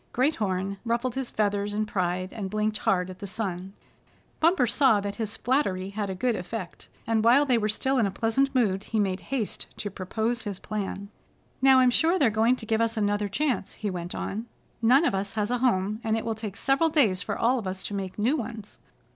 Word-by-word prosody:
Great 270 +5 +2
Horn 195 -1 -1
ruffled 235 +1 -1
his 265 -1 -3
feathers 205 -1 0
in 215 0 0
pride, 185 -2 -2
and 205 -4 -4
blinked 215 +1 -1
hard 180 -1 +1
at 185 - -12
the 200 - -6
sun. 190 -1 -4 0.7
Bumper 330 -4 +4
saw 240 -2 +4
that 200 0 -4
his 220 -2 -4
flattery 200 -8 0
had 205 -1 -3
a 190 - -3
good 240 +5 0
effect, 180 0 -6 0.2
and 225 -1 +1
while 250 +5 +6
they 255 -3 +3
were 215 -1 0
still 265 +5 0
in 220 - +3
a - - -1
pleasant 265 +7 0
mood 205 -5 +1
he 220 - -1
made 190 -2 0
haste 255 -6 -2
to 205 - -4
propose 220 +6 -2
his 205 -4 -4
plan. 200 -1 -5 0.5
"Now 265 0 +7
I'm 250 -1 +5
sure 330 +8 +3
they're 270 -10 +3
going 225 +4 +3
to 235 - -10
give 220 0 +1
us 230 0 0
another 205 -1 0
chance," 255 -1 -1
he 210 -2 -3
went 175 -1 -5
on. 220 +4 -4 0.3
"None 255 +8 +5
of - - +1
us 195 +1 -2
has 215 0 -1
a 245 - +1
home, 215 -3 +1
and 220 -1 +1
it 225 - -4
will 225 - 0
take 215 -2 -7
several 275 +7 +2
days 225 - +3
for - - -3
all 245 +2 +2
of 210 - -5
us 190 +1 -5
to - - -5
make 190 -2 -4
new 235 +8 +2
ones. 225 -6 -6
215 Hz, 220 wpm, -27 LUFS, 195-245 Hz, 0.7 s, Now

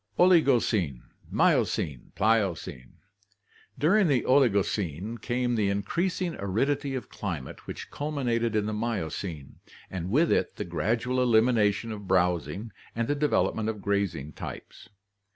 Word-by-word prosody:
Oligocene, 120 - +3 0.3
Miocene, 70 -6 +1
Pliocene. 100 - 0 0.4
— 100 -2 -32
During 195 +4 +5
the 135 -6 +2
Oligocene 105 - +1
came 120 +1 0
the 105 -4 +1
increasing 170 - -1
aridity 135 +8 0
of 130 - -5
climate 85 -10 -6
which - - -7
culminated 120 -6 -1
in 105 -1 +1
the 110 - -2
Miocene, 95 -8 -4 0.3
and 90 -1 -4
with 155 - +3
it - - +1
the - - -4
gradual 120 +4 0
elimination 115 -2 +3
of 105 -2 -7
browsing 90 +2 0 0.2
and 115 0 -1
the - - +2
development 140 -6 +1
of 110 -2 -4
grazing 100 -8 -1
types. - - -9
110 Hz, 125 wpm, -27 LUFS, 95-125 Hz, 0.4 s, During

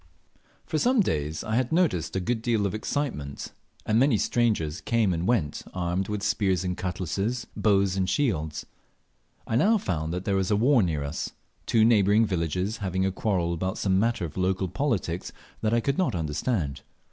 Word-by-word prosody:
Far 155 - -1
some 250 - +4
days 75 - -1
I 110 - -3
had 125 -1 0
noticed 160 - +1
a - - +1
good 115 +5 -1
deal 115 -3 +1
of 100 - -1
excitement, 110 - -3 0.3
and 110 +1 +2
many 130 -3 +4
strangers 100 -10 0
came 115 -5 +1
and 85 +2 -2
went 100 -12 0
armed 90 +1 -1
with 105 -1 -3
spears 100 -4 +1
and 90 -1 -2
cutlasses, 95 +6 -2
bows 100 -3 +2
and 95 -1 0
shields. 80 - -1 0.8
I 115 - -2
now 215 - +4
found 80 - -2
there 90 +3 -1
was 95 +1 0
war 120 +5 +4
near 80 -6 0
us 70 +2 -4 0.3
two 110 -1 +4
neighbouring 105 -1 +4
villages 90 +2 -1
having 95 -2 -1
a 95 - +1
quarrel 90 -4 0
about 95 +3 -2
some 95 -1 +2
matter 115 -4 +1
of 80 - -8
local 95 0 0
politics 100 - -2 0.3
that 110 - +1
I 115 - +3
could 140 +6 -1
not 180 - +1
understand. 80 - -2
95 Hz, 175 wpm, -26 LUFS, 90-115 Hz, 0.8 s, some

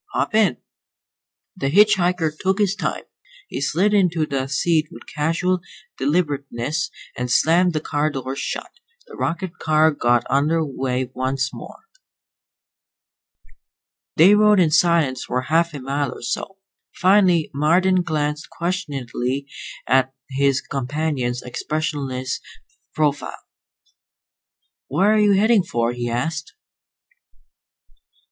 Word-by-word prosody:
Hop - - -1
in." 215 - +3 1.0
The 135 - -2
hitch 210 +7 +6
hiker 175 -3 +1
took 190 +4 0
his 205 -3 +2
time. - - -3 0.5
He - - -4
slid 180 +9 +1
into 175 -6 +2
the 135 -2 -2
seat 155 +3 +1
with - - -13
casual 165 +4 0 0.4
deliberateness 145 -1 -1 0.3
and 125 0 -3
slammed 170 +7 +3
the 155 - -1
car 150 0 0
door 135 -2 -5
shut. 140 - -4 0.3
The 470 - -13
rocket 170 +2 -3
car 155 0 +3
got 120 -4 +1
under 155 +4 +1
way 130 -2 -3
once 130 +1 -2
more. 445 - -11 2.3
They 180 +5 +7
rode 210 -1 +5
in 165 -4 +3
silence 155 -5 +2
for 125 - -1
half 165 +4 +1
a - - -5
mile 140 +1 -2
or - - -11
so. 190 +10 -4 0.4
Finally 185 -4 +3
Marden 180 +6 +3
glanced 150 -2 -2
questioningly 140 -7 -3 0.4
at 130 0 +2 0.2
his 135 0 +1
companion's 135 -2 -2
expressionless 135 -1 -3 0.6
profile. 145 -2 -1 1.5
"Where 190 +10 +2
are 215 - +3
you 205 -1 +4
headed 210 0 +3
for?" 120 0 0
he 120 0 -3
asked. 155 +7 -3
155 Hz, 120 wpm, -21 LUFS, 135-180 Hz, 2.3 s, They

